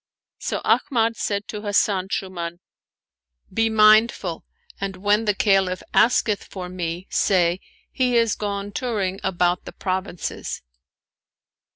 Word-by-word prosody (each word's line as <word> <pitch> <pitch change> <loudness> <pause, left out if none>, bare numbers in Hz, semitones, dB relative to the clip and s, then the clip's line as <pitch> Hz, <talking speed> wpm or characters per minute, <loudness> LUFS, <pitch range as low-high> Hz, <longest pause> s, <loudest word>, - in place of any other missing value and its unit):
So - - -3
Ahmad 230 -4 +2
said 200 -1 -2
to 210 - -5
Hasan 205 -2 +1
Shuuman, 175 -4 -4 0.5
" - - -33
Be 225 +2 +2
mindful 215 -5 +4 0.4
and, 195 -1 -3
when 205 +4 +1
the 210 -2 +2
Caliph 190 -3 +2
;^isketh 225 -3 +3
for 180 -2 -7
me, 175 0 -4
say: 180 -2 +2 0.3
He 250 -2 +1
is 230 -2 +3
gone 205 -1 -4
touring 200 -5 -2
about 180 -1 +1
the - - -7
provinces! 185 - -4
200 Hz, 125 wpm, -23 LUFS, 185-215 Hz, 0.5 s, mindful